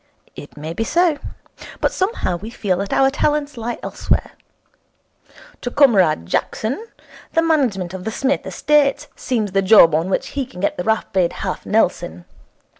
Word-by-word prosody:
It 145 - -11
may 155 +2 -5
be 225 - -2
so. 335 +2 +2 0.6
But - - +1
somehow 375 - -1
we 210 +6 -8
feel 200 -6 -1
that 200 +1 -4
our 270 0 +3
talents 295 0 0
lie 235 0 -4
elsewhere. - - -1 1.3
To 245 - -3
Comrade 200 - +3
Jackson 250 - -2 0.5
the 330 - +3
management 240 - 0
of 190 -1 -6
the 220 - -2
Psmith 270 +4 -1
estates 290 -2 +2
seems 220 -6 -2
the 195 +1 +2
job 190 -4 +7
on 165 +4 0
which 265 +7 -1
he 275 -3 -3
can 180 - -12
get 200 - 0
the 180 - -4
rapid 190 -4 +1
half - - -4
Nelson. 85 +2 0
225 Hz, 160 wpm, -20 LUFS, 185-280 Hz, 1.3 s, job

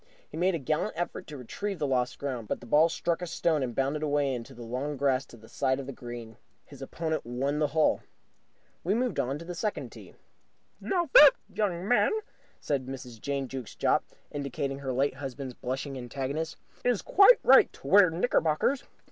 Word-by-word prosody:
He - - -11
made 180 +2 +2
a - - 0
gallant 155 +8 -1
effort 175 +2 -4
to 150 - -8
retrieve 195 - -5
the 155 - -1
lost 125 -2 0
ground, 125 -6 -4
but - - -2
the - - -12
ball 150 +7 +4
struck 170 +1 -1
a 180 - -3
stone 160 -2 0
and 120 -3 -3
bounded 140 +3 0
away 145 -2 +1
into 125 +2 -7
the 120 - -9
long 130 +5 -3
grass 135 -1 +1
to 120 - -14
the 110 0 -16
side 130 +3 0
of 135 - -5
the 135 - -6
green. 120 -3 -9 0.3
His - - -14
opponent 160 -1 -3
won 135 +5 -2
the 150 - +2
hole. 155 +1 +2 0.8
We 190 +5 +1
moved 245 +1 -1
to 135 +3 0
the 175 - -5
second 210 +4 -3
tee. - - -13 0.6
"Now, 345 -6 -1
that 295 -2 +10 0.2
young 190 -3 -1
man," 245 - +4 0.5
said 135 -3 -2
Mrs. 125 -4 -8
Jane 140 -1 -2
Jukes 130 -4 -7
Jopp, - - +2 0.3
indicating 140 -1 -3
her 135 -2 -3
late 135 +2 +1
husband's 135 -1 -6
blushing 130 +3 -4
antagonist, 140 +6 -4 0.3
"is 245 -4 +1
quite 405 +5 +7
right - - +7
to - - -17
wear 200 -3 +7
knickerbockers. 170 - +1
140 Hz, 190 wpm, -28 LUFS, 130-170 Hz, 0.8 s, that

